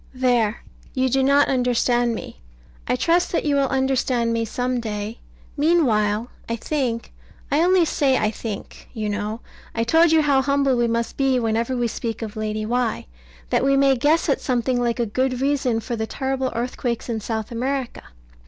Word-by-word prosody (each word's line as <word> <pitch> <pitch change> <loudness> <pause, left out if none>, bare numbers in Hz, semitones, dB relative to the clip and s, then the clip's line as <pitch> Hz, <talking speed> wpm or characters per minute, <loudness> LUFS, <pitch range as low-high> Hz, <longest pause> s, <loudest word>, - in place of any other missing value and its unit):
There 245 -4 +1 0.3
you 260 0 +2
do 270 +2 +2
not 280 +2 +4
understand 245 -2 +1
me. - - -9 0.5
I - - +2
trust 340 +7 +2
that - - 0
you 295 - +2
will 275 -1 +2
understand 260 -3 +1
me 230 0 0
some 250 +2 -2
day. 215 0 -5 0.4
Meanwhile, 240 -9 +2 0.2
I 230 - 0
think 235 -2 -2 0.4
I 290 +3 +3
only 360 0 +4
say 275 -4 +2
I 215 - +1
think 215 -2 -7
you 215 -2 -2
know 210 +2 -3 0.3
I 230 - +1
told 325 +7 +4
you 320 -1 +4
how 280 -2 +3
humble 275 -1 +2
we 240 -1 +2
must 230 0 -2
be 270 -2 +2
whenever 230 +2 0
we 240 -1 +1
speak 230 0 -4
of 220 0 -6
Lady 215 0 -3
Why 240 0 -1 0.5
that - - +2
we 275 0 +3
may 275 -1 +4
guess 295 +8 +2
at 280 - +1
something 245 -1 0
like 240 0 0
a 235 - +2
good 255 +3 -1
reason 265 -4 +1
for 235 +2 -4
the 220 -1 -3
terrible 265 0 -2
earthquakes 240 0 -3
in 230 -2 -2
South 220 0 -4
America. 255 +2 -3
245 Hz, 180 wpm, -22 LUFS, 230-270 Hz, 0.5 s, not